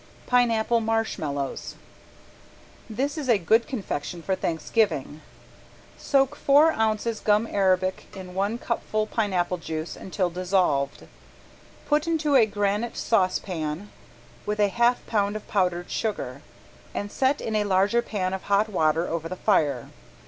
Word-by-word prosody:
~PINEAPPLE 235 -2 +3
MARSHMALLOWS~ 160 -12 -2 1.1
This 275 +8 -2
is 275 -4 -4
a 230 - +6
good 220 +6 +2
confection 175 - -4
for 190 - 0
Thanksgiving. 165 - -1 0.7
Soak 270 -2 +1
four 295 +3 +5
ounces 220 -2 0
gum 210 +1 +2
arabic 185 -3 +1
in 185 -1 -9
one 200 +4 -1
cupful 215 -3 -2
pineapple 185 -5 0
juice 160 0 -5
until 185 -2 -2
dissolved. 175 -6 0 0.8
Put 300 +2 +1
into 310 -3 +1
a 230 -5 +6
granite 205 +2 -1
saucepan 185 -3 -1 0.5
with 210 0 -3
a 205 -1 +4
half 240 +4 +2
pound 205 -2 0
of 215 - -7
powdered 180 -3 0
sugar, 140 - -3 0.5
and 205 0 -3
set 270 +2 +1
in 220 - -3
a 210 - +2
larger 200 +4 +3
pan 190 -5 -2
of 190 - -3
hot 205 +2 +3
water 160 -3 +1
over 165 0 -3
the 185 - -4
fire. 145 - +1
205 Hz, 135 wpm, -25 LUFS, 180-225 Hz, 1.1 s, a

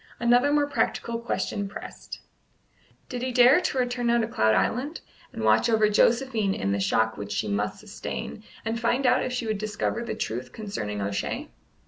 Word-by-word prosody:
Another 245 +4 +4
more 295 0 +3
practical 235 -3 -1
question 215 -3 -2
pressed. - - -9 0.9
Did 250 -1 -5
he 255 0 -1
dare 250 +6 +6
to 270 - -1
return 245 -1 0
now 235 0 +4
to 230 - +2
Cloud 110 - +2
Island, 265 - 0 0.3
and 110 - -6
watch 110 - +4
over 220 -2 +4
Josephine 225 -2 +2
in 100 - -1
the 100 - 0
shock 110 +3 +1
which 100 0 -6
she 105 - -1
must 105 +1 -1
sustain, - - -6 0.2
and 225 +1 -1
find 245 +3 +1
out 250 0 +4
if 255 - -2
she 245 -1 -2
would 215 -2 -1
discover 215 +2 -2
the - - -4
truth 125 +3 -4
concerning 105 - -4
O'Shea? 100 0 -3
225 Hz, 180 wpm, -26 LUFS, -, 0.9 s, dare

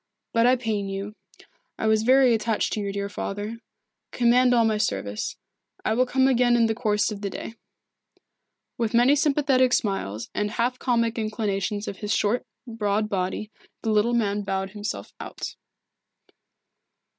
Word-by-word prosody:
But 230 +1 +4
I 255 - +5
pain 215 -5 -2
you. 195 +2 -5 0.6
I - - -3
was 220 0 +3
very 255 +2 +5
much - - +4
attached 220 -1 0
to - - -2
your 200 -1 -2
dear 200 0 -3
father. 205 +3 -5 0.5
Command 250 +1 +4
all 235 -2 +4
my 215 -1 +1
service. 100 - -2 0.5
I 220 - +2
will 250 +3 +2
come 260 +1 +3
again 245 -2 +4
in 235 -1 +4
the 225 - +1
course 215 -2 0
of 205 -1 -6
the 200 - -2
day." 225 - -7 1.3
With 230 -1 0
many 245 +4 +5
sympathetic 275 -4 +3
smiles 115 - -1
and 210 0 -1
half 240 +3 -1
comic 230 -2 +1
inclinations 210 -2 -2
of 195 - -5
his 210 -1 -4
short, 215 +4 +1 0.2
broad 215 -2 -1
body, 195 +2 -2 0.3
the 225 - 0
little 215 +3 +2
man 205 -3 +1
bowed 195 -1 -3
himself 210 +1 -5
out. - - -6
220 Hz, 160 wpm, -25 LUFS, 205-240 Hz, 1.3 s, I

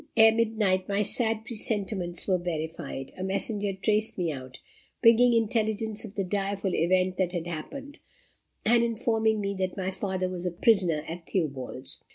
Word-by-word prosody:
Ere 225 0 +8
midnight, 215 -5 +1
my 200 +1 +2
sad 220 0 0
presentiments 205 -6 -3
were 185 -2 +2
verified. 160 -5 -4
A - - -2
messenger 200 +1 0
traced 215 +3 +1
me 175 -3 0
out, 130 -2 -8 0.4
bringing 235 +1 +6
intelligence 220 -1 0
of 215 -2 -9
the 200 - 0
direful 195 0 -1
event 185 +2 +2
that 185 -2 0
had 170 -2 -2
happened, 275 - -7 0.7
and 235 +1 +5
informing 225 -2 +1
me 200 -1 -1
that 185 0 -2
my 190 0 -1
father 185 -1 -2
was 180 -1 -5
a - - -1
prisoner 175 -5 +2
at 165 +1 -7
Theobalds. 135 -6 -3
195 Hz, 160 wpm, -28 LUFS, 180-220 Hz, 0.7 s, Ere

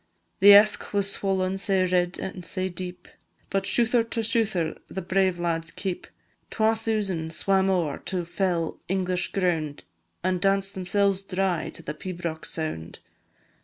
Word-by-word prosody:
The 200 +1 +10
Esk 210 +1 +5
was 200 0 +3
swollen 190 -1 0
sae 190 -1 +2
red 180 0 +1
an' 190 -1 -5
sae 185 +2 -1
deep, 180 0 -7 0.4
But 195 0 0
shouther 235 0 +3
to 230 0 -3
shouther 215 -8 0
the - - -5
brave 185 0 +1
lads 165 -1 -2
keep; 185 +1 -4 0.4
Twa 220 0 +2
thousand 205 -8 -2
swam 195 -1 +2
ower 170 -7 0
to 180 -2 -2
fell 170 -2 -1
English 185 -1 -1
ground, 165 -6 -1 0.4
An' 185 0 +1
danced 195 +1 +1
themselves 195 +1 +1
dry 190 -3 -1
to - - -11
the 150 - -4
pibroch 170 -1 -5
sound. 120 - -4
185 Hz, 145 wpm, -26 LUFS, 175-195 Hz, 0.4 s, The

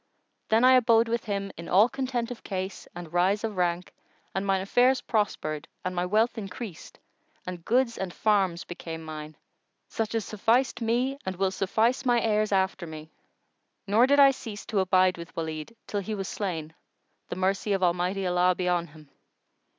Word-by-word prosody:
Then 225 +2 +4
I 255 +1 +7
abode 230 -2 +4
with 235 0 -2
him 200 -1 -3
in 170 - -8
all 200 +5 +6
content 250 -2 -3
of 245 - -8
case 190 0 -5
and 175 -2 -8
rise 190 +4 +2
of 220 -2 -3
rank 175 0 -1 0.4
and 190 - -1
mine 195 -1 +1
affairs 250 +6 +3
prospered 160 -8 -2 0.2
and 180 0 -2
my 180 0 0
wealth 220 +4 +2
increased 195 -2 -8 0.5
and 180 -2 -6
goods 240 +2 +1
and 190 -2 -3
farms 190 -4 +1
became 165 -2 -7
mine, 155 -1 -8 0.5
such 225 0 -2
as 225 -3 -1
sufficed 240 +4 +1
me 250 +4 0
and 190 0 -3
will 190 +1 0
suffice 220 +7 +1
my 245 -2 +3
heirs 215 -2 +1
after 190 -2 0
me; 155 0 -9 0.7
nor 215 +5 +4
did 285 +1 +4
I 275 -1 +8
cease 220 -5 -8
to 210 - -1
abide 185 -1 +3
with 170 0 -10
Walid, 160 +4 -4
till 205 - -2
he 210 +2 -4
was 195 -2 -4
slain, 165 -7 -4 0.6
the - - -3
mercy 195 +3 0
of 195 -1 +1
Almighty 180 +2 +1
Allah 180 0 +3
be 180 0 -2
on 175 -1 +1
him!" 150 -2 -17
195 Hz, 180 wpm, -27 LUFS, 180-225 Hz, 0.7 s, I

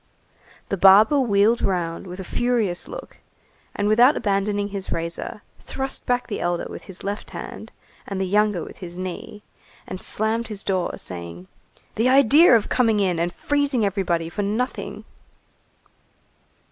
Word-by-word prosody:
The 195 - -1
barber 205 +9 +7
wheeled 220 -1 +3
round 175 -1 -2
with 180 +1 -8
a - - -4
furious 225 -4 -1
look, - - -9 0.6
and 205 - 0
without 240 +7 +5
abandoning 205 -1 0
his 195 -1 -5
razor, 170 +5 -4 0.2
thrust 270 0 -4
back 245 0 +1
the 210 - -4
elder 175 0 -1
with - - -9
his 190 -2 -10
left 200 +1 -4
hand - - -8 0.4
and 195 -1 -4
the 190 - 0
younger 210 -2 +1
with - - -11
his 175 -2 -8
knee, 185 +3 -6 0.4
and 185 - -7
slammed 220 +2 -1
his 210 -2 -6
door, 185 -3 -1
saying: 85 0 -8 0.5
"The 230 +4 +2
idea 275 +2 +7
of 220 - +2
coming 225 -4 +2
in 185 -4 +1
and 170 +1 0
freezing 285 -1 0
everybody 180 -4 -1
for 190 +5 -4
nothing!" 215 +5 -3
205 Hz, 150 wpm, -23 LUFS, 180-230 Hz, 0.6 s, barber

